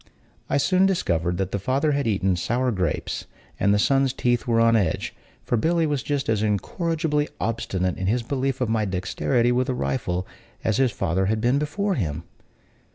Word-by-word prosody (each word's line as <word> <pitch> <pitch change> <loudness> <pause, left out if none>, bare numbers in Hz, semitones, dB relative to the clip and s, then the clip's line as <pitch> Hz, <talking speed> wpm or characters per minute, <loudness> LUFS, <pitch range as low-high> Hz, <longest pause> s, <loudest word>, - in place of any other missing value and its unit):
I - - +2
soon 185 +6 +3
discovered 85 - 0
that 95 0 -2
the 100 - -1
father 135 +9 +1
had 140 -3 0
eaten 95 -3 +1
sour 125 +8 0
grapes, 90 -7 -2 0.3
and 100 - +3
the 105 - +4
son's 135 +4 +2
teeth 120 -2 0
were 115 -1 +3
on 115 0 +5
edge; 95 -8 0 0.3
for 120 - 0
Billy 165 +7 +2
was 145 -3 0
just 145 0 -2
as 110 -2 +1
incorrigibly 150 - 0
obstinate 95 -5 -1
in 95 - -1
his 120 +4 +1
belief 135 +1 -2
of 125 - +2
my 110 -1 +1
dexterity 100 +6 0
with 125 +1 +1
a 130 - 0
rifle 95 -9 -2 0.4
as 110 - +1
his 130 -2 +3
father 95 -1 0
had 110 +1 +1
been 125 +5 +2
before 195 +7 -1
him. 80 - -2
120 Hz, 185 wpm, -24 LUFS, 95-140 Hz, 0.4 s, on